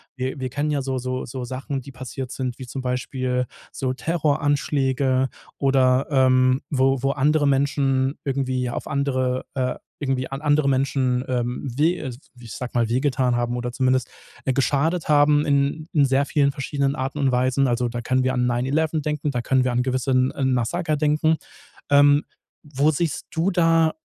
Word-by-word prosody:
wir 130 +2 -3
wir 130 -1 -3
kennen 145 +3 -1
ja 145 -2 0
so 130 0 -2
so 130 0 -3
so 125 +1 -6
Sachen, 135 +3 -4
die 135 +2 -11
passiert 130 0 -7
sind, 125 -2 -4
wie 130 - -8
zum 130 +2 -6
Beispiel 125 0 -2 0.3
so 130 -1 -2
Terroranschläge 140 -3 0 0.3
oder, 135 -1 +3
ähm, 130 -1 +3
wo 135 -2 +2
wo 135 - +2
andere 145 +2 +2
Menschen 135 -1 +1
irgendwie 130 -2 -1
auf - - -5
andere 130 -3 -1
äh, 130 -3 -1 0.2
irgendwie 135 -2 -1
an 135 +1 -5
andere 150 -1 +2
Menschen, 130 -2 +1
ähm, 125 -1 -2 0.2
we 165 +5 +3
äh, 130 -6 -5 0.3
ich 115 -3 -10
sage 125 -1 -5
mal, 115 -2 +1
wehgetan 130 0 +1
haben 120 0 -1
oder 125 0 -3
zumindest, 130 0 +1 0.4
äh, 130 - +1
geschadet 145 +6 0
haben 150 0 +4
in 140 +1 +1
in 150 - +4
sehr 135 +1 +2
vielen 140 0 +2
verschiedenen 140 0 -1
Arten 135 +1 -3
und 135 -2 +2
Weisen. 130 +2 +2
Also 120 0 0
da 120 0 -4
können 130 +2 +1
wir 130 - +1
an 125 -1 +1
9/ 120 0 0
11 155 +2 0
denken, 150 0 -2
da 125 -3 -2
können 130 0 +2
wir 125 - 0
an 120 0 +1
gewissen 130 0 +1
'n 130 -1 -1
Massaker 155 +6 0
denken. 155 +2 +2 0.6
Ähm, 145 +1 +6 0.4
wo 145 0 +1
siehst 155 0 -2
du 170 +4 0
da 165 -2 +3
135 Hz, 180 wpm, -23 LUFS, 130-145 Hz, 0.6 s, Ähm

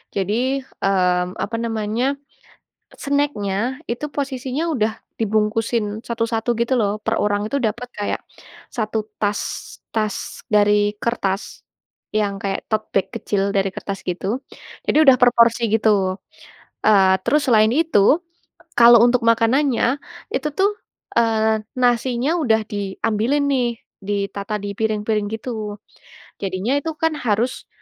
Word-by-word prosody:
Jadi, 195 +1 0 0.5
mmm, 180 -2 +1
apa 230 - -4
namanya, 225 0 -1 1.0
snack-nya, 260 -4 -1
itu 240 +5 -3
posisinya 265 0 -2
udah 220 -6 +1 0.3
dibungkusin 220 +1 +1 0.2
satu-satu 230 0 -2
gitu 235 +2 0
loh. 205 -3 +2
Per - - +1
orang 205 0 +1
itu - - 0
dapet 240 +3 -3
kayak 205 - -2 0.5
1 220 -1 -2 0.2
tas, 205 -1 0 0.5
tas 215 -2 0 0.4
dari 205 0 +4
kertas 200 -4 -2 0.5
yang 205 -2 0
kayak 195 -1 -1
tote 215 0 0
bag 195 -1 +2
kecil 200 -2 -1
dari 195 0 +2
kertas 195 -1 -5
gitu. 180 +1 -3 0.6
Jadi - - +3
udah 270 -3 +7
per 245 - +7
porsi 235 0 +4
gitu, 200 -4 +2 0.7
eee, 195 -3 +6
terus 295 +5 +3
selain 215 -2 +5
itu, 320 -4 +2 0.8
kalo 235 0 +9
untuk 245 0 +2
makanannya, 230 +4 +3 0.5
itu 270 - -1
tuh, 395 +2 +3 0.5
eee, 220 -1 +2 0.2
nasinya 245 +2 +2
udah 220 -6 +3
diambilin 215 +7 0
nih, 255 -3 +2 0.4
ditata 200 0 -2
di 205 - -3
piring-piring 215 -1 0
gitu. 215 -2 -5 0.6
Jadinya 195 +5 -1
itu 325 - -3
kan 320 -1 +2
harus 225 +4 0
220 Hz, 125 wpm, -21 LUFS, 205-245 Hz, 1.0 s, kalo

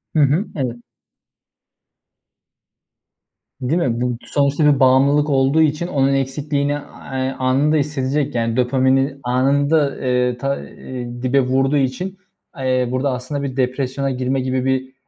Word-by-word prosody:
Hı - - +3
hı, 150 +9 +2
evet. 120 -4 -3 2.8
Değil 145 +8 0
mi, 120 -6 0
bu 125 -1 -1
sonuçta 145 +1 +1
bir 145 -2 +4
bağımlılık 140 +3 +4
olduğu 135 +3 +3
için 155 +3 +1
onun 140 -5 +1
eksikliğini, 140 +1 -1
eee, 135 -2 -4
anında 135 +4 +2
hissedecek, 145 -1 -1
yani, 115 0 0
dopamini 130 +2 +2
anında, 140 +4 +2
eee, 125 -1 +1
ta 140 +2 -2
eee, 120 -1 -8
dibe 135 +2 +3
vurduğu 135 +2 +1
için, 140 +9 -2 0.4
eee, 130 -2 0
burada 130 +2 0
aslında 130 +3 -4
bir 135 -2 -4
depresyona 130 +1 -1
girme 130 +1 -1
gibi 130 0 -1
bir, 130 0 -1
135 Hz, 130 wpm, -19 LUFS, 130-145 Hz, 2.8 s, bir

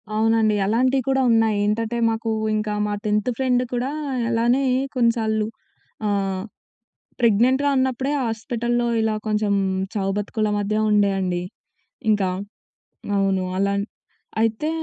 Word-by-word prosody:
అవునండి. 220 -1 +3
అలాంటియి 255 +5 +2
కూడా 265 0 +2
ఉన్నాయి. 225 -2 +3
ఏంటటే 225 +3 -1
మాకూ 225 0 -2 0.3
ఇంకా 210 0 -1
మా 210 - -2
10థ్ 210 +2 +1
ఫ్రెండ్ 255 -2 +2
కుడా 245 +2 -1 0.4
అలానే 240 +3 +2 0.3
కొన్నిసార్లు 225 -3 +1 0.6
ఆహ్, 195 -2 -1 0.8
ప్రెగ్నెంట్‌గా 250 +5 +3
ఉన్నప్పుడే 260 +1 0
హాస్పిటల్‌లో 240 +2 -1 0.2
ఇలా 220 -1 +1
కొంచెం 210 -1 +1 0.4
చావు 195 -3 -1
బతుకుల 210 +1 -1
మధ్య 205 +1 -1 0.2
ఉండే 205 -1 +4
అండి. 180 -2 -1 0.7
ఇంకా. 200 -3 +2 0.9
అవును. 195 -1 +1
అలాన్ 200 +1 +1 0.6
అయితే 225 +7 0
220 Hz, 115 wpm, -22 LUFS, 205-240 Hz, 0.9 s, ఉండే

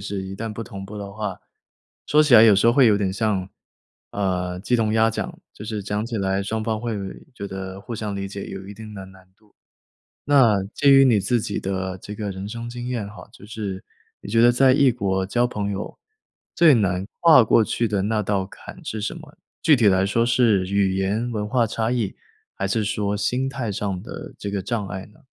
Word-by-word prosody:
是 100 -1 -4
一 95 - -7
旦 110 +1 -4
不 115 - -5
同 95 -2 -8
步 105 +2 -9
的 100 -1 -7
话， 105 -3 -4 0.7
说 150 +1 +5
起 145 -5 +4
来 110 - +10
有 105 -3 +7
时 100 - +3
候 120 - +6
会 135 -1 +5
有 105 -2 +5
点 95 -2 -1
像， 100 -3 -1 0.6
呃， 90 -2 -2
鸡 120 +4 +1
同 110 -1 +1
鸭 110 0 +3
讲， - - -5 0.2
就 105 - -10
是 105 -2 -4
讲 105 +2 -2
起 115 -2 -4
来 95 -1 0
双 110 +2 -3
方 110 -1 -2
会 120 -2 -3 0.4
觉 100 -3 -6
得 95 0 -7
互 115 - -7
相 105 -2 -4
理 100 0 -4
解 100 0 -6
有 95 0 -8
一 - - -7
定 110 0 -10
的 95 -1 -7
难 95 -1 -17
度。 105 -1 -30 0.7
那 120 -9 +4
基 140 -1 +4
于 135 0 +7
你 115 -5 +4
自 115 +4 +1
己 105 -2 -3
的 95 -1 -3
这 105 - -8
个 105 -1 -4
人 95 +2 -6
生 120 +1 -6
经 120 0 -6
验 115 -5 -3
哈， 105 - -12
就 - - -15
是 100 -4 -5 0.4
你 100 - -9
觉 115 +1 +3
得 120 +1 +6
在 130 +1 +5
异 135 -2 +4
国 95 -5 -1
交 120 +4 +1
朋 100 -3 -3
友， 100 - -6 0.6
最 165 -3 +6
难 95 -4 +1 0.2
跨 160 -7 +7
过 115 0 +4
去 115 +1 -1
的 100 -2 0
那 105 +1 0
道 95 -1 -1
坎 - - -12
是 110 - -4
什 105 - -3
么？ - - -13 0.3
具 150 -3 +6
体 115 - +3
来 95 0 +3
说 115 +4 +1
是 110 -6 +3
语 100 -1 +1
言 105 +5 -1
文 105 -2 -3
化 120 0 +2
差 115 +1 -1
异？ 115 -6 -2 0.4
还 95 - -2
是 110 +3 0
说 105 -1 -1
心 125 +6 0
态 130 -5 -4
上 95 -2 -3
的 - - -9
这 100 - -5
个 100 -1 -2
障 105 -1 -3
碍 95 -1 -6
呢？ 105 +9 -22
105 Hz, 245 characters per minute, -23 LUFS, 95-115 Hz, 0.7 s, 来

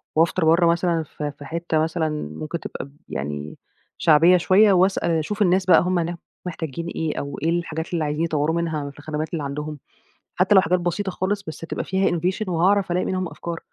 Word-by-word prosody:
وأفطر 165 +2 +2
برّه 170 +2 +5
مثلًا 170 -1 +1
ف 150 - -9
في 145 -1 -5
حِتّة 165 0 -1
مثلًا 160 0 0 0.3
ممكن 155 +2 -4
تبقى - - -6
ب 140 +1 -19
يعني 75 +2 -5 0.4
شعبية 165 +4 +6
شوية 195 +3 +5
واسأل 185 -1 +2
أشوف 165 +7 -1
الناس 185 0 +3
بقى 185 - +6
هُم 180 0 +1
هناك 170 +1 -2 0.3
محتاجين 165 -2 -5
إيه، 160 -2 -2
أو 140 0 -5
إيه 165 - +2
الحاجات 170 -1 -2
اللي 165 -2 0
عايزين 150 +2 -1
يطوّروا 160 0 0
منها 160 -4 -2
في 145 - -18
الخدمات 155 +2 -4
اللي 155 -3 -2
عندهم، 150 +1 -5 0.6
حتى 190 +3 +3
لو 190 - +8
حاجات 180 +2 +1
بسيطة 180 +3 -2
خالص 200 +2 -2
بس 160 - -6
تبقى 165 - -4
فيها 190 0 +1
innovation 185 +5 -1
وهاعرف 185 +2 +2
ألاقي 180 +1 +1
منهم 185 -1 -1
أفكار. 170 -1 -6
170 Hz, 195 wpm, -23 LUFS, 155-180 Hz, 0.6 s, لو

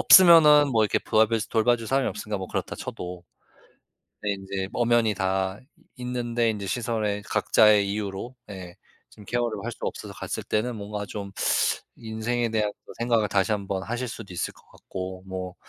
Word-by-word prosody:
없으면은 155 -5 +8
뭐 110 - +4
이렇게 - - +1
보살펴서 110 0 +2
돌봐줄 115 0 +2
사람이 135 +1 +1
없으니까 105 -2 -4
뭐 95 - -6
그렇다 - - -3
쳐도. 90 0 -6 1.0
네, 105 - 0
인제 95 0 -4
엄연히 120 -2 +3
다 95 0 -1 0.4
있는데 120 -2 -1
인제 105 -3 -3
시설에 110 -2 -1
각자의 105 0 +4
이유로, 105 +4 -4
예, 90 -3 -8 0.3
좀 105 - -15
케어를 120 +2 -1
할 120 - -3
수 - - -11
없어서 - - -4
갔을 - - -5
때는 120 +3 -1
뭔가 105 0 -5
좀 100 -1 -6 0.7
인생에 115 +2 -2
대한 105 -2 0
그 - - -11
생각을 115 -2 +2
다시 100 +1 +1
1 100 -2 -1
번 95 -1 -2
하실 120 +4 -3
수도 110 -5 -8
있을 85 - -3
것 - - -21
같고, 95 0 -7
뭐 95 -1 -5
105 Hz, 335 characters per minute, -26 LUFS, 100-120 Hz, 1.0 s, 없으면은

